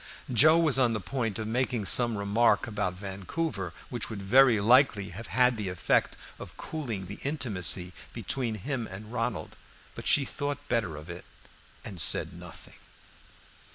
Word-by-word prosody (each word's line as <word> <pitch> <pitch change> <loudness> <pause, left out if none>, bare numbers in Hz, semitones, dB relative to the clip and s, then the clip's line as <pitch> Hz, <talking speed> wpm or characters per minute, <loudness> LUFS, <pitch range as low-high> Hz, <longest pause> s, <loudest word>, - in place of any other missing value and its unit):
Joe 155 +8 +6
was 155 -5 +3
on 120 -3 +3
the 110 - -2
point 115 +2 -3
of 110 - -4
making 120 -1 -1
some 120 +3 +4
remark 100 +4 +2
upon 100 -5 -3
Vancouver, 100 - -4 0.2
which 120 -3 -3
would 110 -3 -6
very 120 +3 +5
likely 110 -2 +3
have 110 +6 -9
had 125 -2 +2
the 100 -3 -3
effect 90 - 0 0.2
of - - -11
cooling 120 -12 -5
the 100 +3 -9
intimacy 100 - -1 0.2
between 120 -5 -2
him 120 +2 -4
and 105 +4 -10
Ronald; 115 -2 -3 0.4
but - - -7
she 140 - +4
thought 145 +1 -5
better 110 -10 -1
of 75 +2 -10
it, 85 - -9 0.6
and 90 -5 -3
said - - +4
nothing. - - -12
115 Hz, 155 wpm, -28 LUFS, 100-130 Hz, 0.6 s, Joe